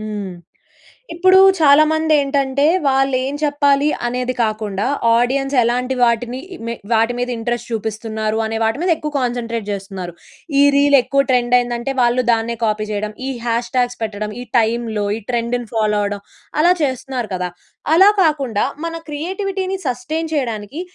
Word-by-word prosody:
హ్మ్. 210 Hz, -3 st, -5 dB, 0.8 s
ఇప్పుడూ 375 Hz, +2 st, +5 dB, 0.2 s
చాలామందేంటంటే, 285 Hz, -2 st, +3 dB, 0.2 s
వాళ్ళేం 270 Hz, 0 st, +1 dB
చెప్పాలి 285 Hz, -1 st, +2 dB, 0.2 s
అనేది 250 Hz, +1 st, -2 dB
కాకుండా, 215 Hz, -2 st, -2 dB, 0.3 s
ఆడియన్స్ 270 Hz, +3 st, 0 dB
ఎలాంటి 250 Hz, +2 st, 0 dB
వాటిని 240 Hz, +1 st, +1 dB, 0.3 s
మె 235 Hz, -, -2 dB, 0.2 s
వాటి 225 Hz, +2 st, +2 dB
మీద 245 Hz, -, -2 dB
ఇంట్రెస్ట్ 240 Hz, +1 st, -3 dB
చూపిస్తున్నారు 220 Hz, 0 st, -3 dB
అనే 220 Hz, 0 st, -3 dB
వాటి 225 Hz, +3 st, 0 dB
మీద 365 Hz, -, 0 dB
ఎక్కువ 300 Hz, -1 st, -5 dB
కాన్సంట్రేట్ 235 Hz, -3 st, -3 dB
జేస్తున్నారు. 195 Hz, -3 st, -6 dB, 0.5 s
ఈ -, -, +7 dB
రీలెక్కువ 275 Hz, -1 st, +4 dB
ట్రెండయిందంటే, 245 Hz, +1 st, +1 dB
వాళ్ళు 245 Hz, +1 st, +3 dB
దాన్నే 230 Hz, +1 st, 0 dB
కాపీ 215 Hz, 0 st, -1 dB
చెయడం, 210 Hz, +1 st, -3 dB
ఈ -, -, -2 dB, 0.2 s
హ్యాష్‌‌ట్యాగ్స్ 240 Hz, +1 st, -1 dB
పెట్టడం, 210 Hz, -1 st, -4 dB
ఈ -, -, -5 dB
టైంలో 225 Hz, -2 st, 0 dB
ఈ -, -, -7 dB
ట్రెండుని 240 Hz, 0 st, -1 dB
ఫాలో 210 Hz, -2 st, +1 dB
అవ్వడం, 205 Hz, 0 st, -3 dB, 0.4 s
అలా 350 Hz, +2 st, +5 dB
చేస్తున్నారు 260 Hz, -3 st, -3 dB
కదా! 180 Hz, 0 st, -3 dB, 0.5 s
అలా 385 Hz, +4 st, +7 dB
కాకుండా 275 Hz, -9 st, 0 dB, 0.2 s
మన 330 Hz, 0 st, -4 dB
క్రియేటివిటీ‌‌‌ని 380 Hz, +5 st, -3 dB
సస్టెయిన్ 305 Hz, +6 st, -3 dB
చెయడానికి, 235 Hz, -, -3 dB
245 Hz, 130 wpm, -18 LUFS, 220-280 Hz, 0.8 s, ఈ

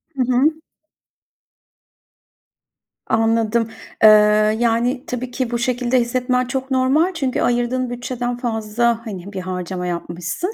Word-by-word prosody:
Hı 270 Hz, -, -1 dB
hı. 305 Hz, +6 st, +2 dB, 2.4 s
Anladım. 225 Hz, 0 st, +1 dB, 0.4 s
Eee, 215 Hz, -, +10 dB, 0.5 s
yani, 240 Hz, +3 st, 0 dB
tabii 250 Hz, 0 st, -4 dB
ki 250 Hz, -1 st, -3 dB
bu 240 Hz, -, -1 dB
şekilde 245 Hz, +1 st, +1 dB
hissetmen 250 Hz, +1 st, 0 dB
çok 265 Hz, +1 st, -4 dB
normal 270 Hz, +8 st, +2 dB
çünkü 270 Hz, -7 st, -1 dB
ayırdığın 245 Hz, +1 st, 0 dB
bütçeden 245 Hz, 0 st, -4 dB
fazla, 230 Hz, -1 st, -1 dB
hani, 200 Hz, -2 st, -7 dB
bir 190 Hz, -, -4 dB
harcama 180 Hz, 0 st, -4 dB
yapmışsın. 175 Hz, -, -4 dB
240 Hz, 115 wpm, -20 LUFS, 225-255 Hz, 2.4 s, Eee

